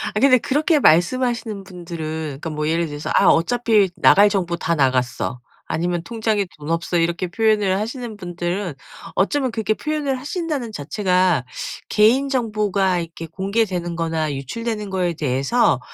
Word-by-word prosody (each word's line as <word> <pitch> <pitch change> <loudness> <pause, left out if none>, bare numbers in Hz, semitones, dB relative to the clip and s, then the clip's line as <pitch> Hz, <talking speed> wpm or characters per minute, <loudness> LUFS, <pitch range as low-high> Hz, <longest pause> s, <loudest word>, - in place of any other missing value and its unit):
아 - - +2
근데 255 0 +6
그렇게 300 +6 +1
말씀하시는 225 - +2
분들은 175 -4 -7 0.4
그러니까 165 - -4
뭐 150 0 -2
예를 165 +1 +1
들어서 145 0 -6
"아 - - +5
어차피 220 +2 +3
나갈 205 +1 +6
정보 180 -4 -1
다 170 0 0
나갔어." 130 -3 0 0.3
아니면 175 +1 -1
"통장에 215 0 -1
돈 150 0 -8
없어." 170 +1 0
이렇게 170 +2 0
표현을 210 0 +2
하시는 230 0 -5
분들은 175 -1 -3 0.4
어쩌면 260 +6 +1
그렇게 220 -1 0
표현을 295 -3 -2
하신다는 290 - -3
자체가 180 - +1 0.4
개인정보가 215 -6 +2
이렇게 165 0 -7
공개되는 190 -1 -1
거나 160 -3 -1
유출되는 210 - -4
거에 180 -2 0
대해서 140 - +1
190 Hz, 360 characters per minute, -21 LUFS, 170-230 Hz, 0.4 s, 근데